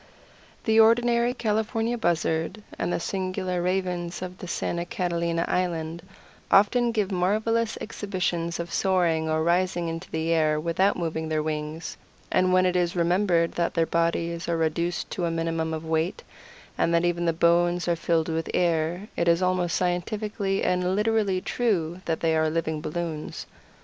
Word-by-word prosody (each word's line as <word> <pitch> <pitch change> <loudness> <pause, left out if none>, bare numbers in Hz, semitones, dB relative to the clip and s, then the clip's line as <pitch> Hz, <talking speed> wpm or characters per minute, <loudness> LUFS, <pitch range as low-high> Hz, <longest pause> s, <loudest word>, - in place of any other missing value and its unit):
The 220 0 +3
ordinary 235 +1 +4
California 225 +1 0
Buzzard 170 0 -1 0.2
and - - -1
the - - 0
singular 185 -1 -2
Ravens 180 -1 -2
of 185 0 -8
Santa 170 0 -2
Catalina 170 -3 -1
Island 170 -2 -1 0.5
often 235 +4 +4
give 210 -3 -1
marvelous 215 +5 +1
exhibitions 180 -6 -2
of 170 0 -5
soaring 170 -4 +1
or 155 0 +1
rising 175 0 +1
into 165 +3 -6
the 160 +1 -1
air 155 -2 +2
without 170 +5 +1
moving 160 -2 -3
their 155 -1 0
wings, 155 +1 -4 0.3
and 185 0 +3
when 185 0 +4
it 180 0 +1
is 175 0 +1
remembered 175 -1 +2
that 170 -1 -1
their 165 -1 +3
bodies 170 0 -1
are 170 - +1
reduced 170 +2 -1
to 175 - -2
a - - 0
minimum 165 -1 -1
of 160 0 -4
weight, 160 +2 -1 0.6
and - - +2
that 170 +1 +3
even 175 0 0
the - - +4
bones 175 +2 +2
are 170 - +2
filled 165 -1 0
with 165 -1 -2
air, 170 +2 0
it 170 - 0
is 170 +2 +3
almost 180 -1 +1
scientifically 195 +2 -1
and 180 +1 +1
literally 210 -3 +1
true 185 -8 -1
that 165 -1 -1
they 160 -1 +2
are 160 0 +2
living 160 -1 -2
balloons. 160 -1 -4
175 Hz, 160 wpm, -26 LUFS, 165-190 Hz, 0.6 s, ordinary